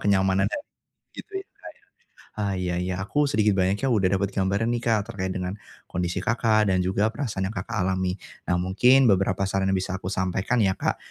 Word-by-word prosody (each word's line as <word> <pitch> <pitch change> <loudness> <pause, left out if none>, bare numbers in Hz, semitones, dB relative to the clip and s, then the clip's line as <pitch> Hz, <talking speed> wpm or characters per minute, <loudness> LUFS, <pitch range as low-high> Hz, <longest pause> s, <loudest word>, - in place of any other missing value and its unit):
kenyamanannya, 95 - +2 0.6
gitu 420 - -9
ya, - - -21
Kak, - - -12
ya? - - -29 0.5
Ah, 100 -2 -2
iya 90 -1 -2
iya. 90 0 -2
Aku 145 +6 +1
sedikit 110 -6 +3
banyaknya 95 +5 +1
udah 105 -8 +2
dapet 100 +1 -2
gambaran 100 +3 0
nih 120 - -2
Kak, 115 -1 0
terkait 95 -1 -3
dengan 90 0 -3 0.3
kondisi 90 0 -3
Kakak, 110 -3 +2
dan 95 - +2
juga 100 +4 +1
perasaan 110 -6 -2
yang 100 - -4
Kakak 110 +4 -4
alami. 95 0 -1 0.3
Nah, 90 - +3
mungkin 125 +9 +4
beberapa 95 -2 +2
saran 95 0 0
yang 95 - +2
bisa 95 0 -3
aku 95 -1 -4
sampaikan 95 +5 -1
ya 100 -5 +3
Kak, - - -1
95 Hz, 195 wpm, -25 LUFS, 95-110 Hz, 0.6 s, mungkin